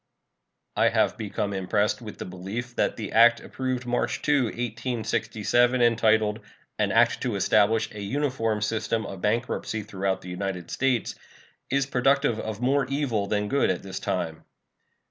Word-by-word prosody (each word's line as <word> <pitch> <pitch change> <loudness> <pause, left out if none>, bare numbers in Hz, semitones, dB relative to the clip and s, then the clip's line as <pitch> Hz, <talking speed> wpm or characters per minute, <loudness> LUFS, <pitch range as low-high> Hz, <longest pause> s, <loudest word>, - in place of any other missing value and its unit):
I - - +4
have - - +2
become 105 -1 -3
impressed 100 +5 0
with 105 -3 -8
the - - -6
belief 100 +7 -6
that - - 0
the 110 -3 -5
act 120 +1 +6
approved 130 -1 -4
March 120 0 -1
2, 145 -4 +3
1867, 120 +1 0
entitled 110 -2 +3 0.4
"An - - +2
act - - +3
to - - -1
establish 110 +1 +3
a 105 - -8
uniform 115 -2 -1
system 110 0 -1
of 95 -2 -7
bankruptcy 110 0 -1
throughout 95 -2 -2
the 90 - -9
United 90 -1 -4
States," 125 -5 0 0.6
is 140 0 +1
productive 135 -2 +2
of 110 -2 -5
more 135 +1 +2
evil 130 -7 -1
than 105 0 0
good 140 +5 +2
at - - -1
this 95 -1 -5
time. 80 -1 -3
110 Hz, 150 wpm, -26 LUFS, 105-125 Hz, 0.6 s, act